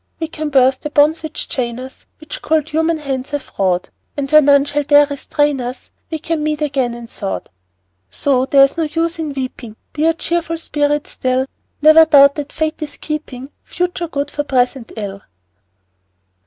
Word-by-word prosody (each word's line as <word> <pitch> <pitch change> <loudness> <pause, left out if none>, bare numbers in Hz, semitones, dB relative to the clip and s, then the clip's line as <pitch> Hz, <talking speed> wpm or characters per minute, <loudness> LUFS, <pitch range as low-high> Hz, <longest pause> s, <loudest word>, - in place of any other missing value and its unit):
We 325 - -2
can 310 -2 -4
burst 265 -1 +3
the 300 - -4
bonds 300 +2 +3
which 315 -1 -5
chain 240 -4 -3
us, 260 +1 -11
Which 310 -1 -8
cold 315 -1 0
human 320 +1 +1
hands 270 -3 -4
have 290 -2 -5
wrought, 185 -2 0 0.3
And 275 -1 -3
where 305 0 +8
none 280 -1 +5
shall 290 0 -1
dare 290 0 +5
restrain 290 -1 -1
us 245 +1 -7 0.2
We 320 - -3
can 320 0 -2
meet 305 0 -1
again, 265 -5 -1
in 240 0 -9
thought. 95 - -5 0.6
So 260 - 0
there's 275 +2 +4
no 325 - +1
use 330 +2 -2
in 310 -2 -3
weeping, 255 -4 -6 0.2
Bear 310 +2 +2
a - - +2
cheerful 330 0 -2
spirit 295 -2 0
still; 255 0 -1 0.4
Never 310 +1 +8
doubt 280 -3 +6
that 290 -1 -6
Fate 315 0 -2
is 295 -1 -6
keeping 290 -3 -6
Future 355 -1 -3
good 290 -2 -3
for 290 - -2
present 255 -3 0
ill! 200 -2 -5
290 Hz, 180 wpm, -17 LUFS, 260-310 Hz, 0.6 s, where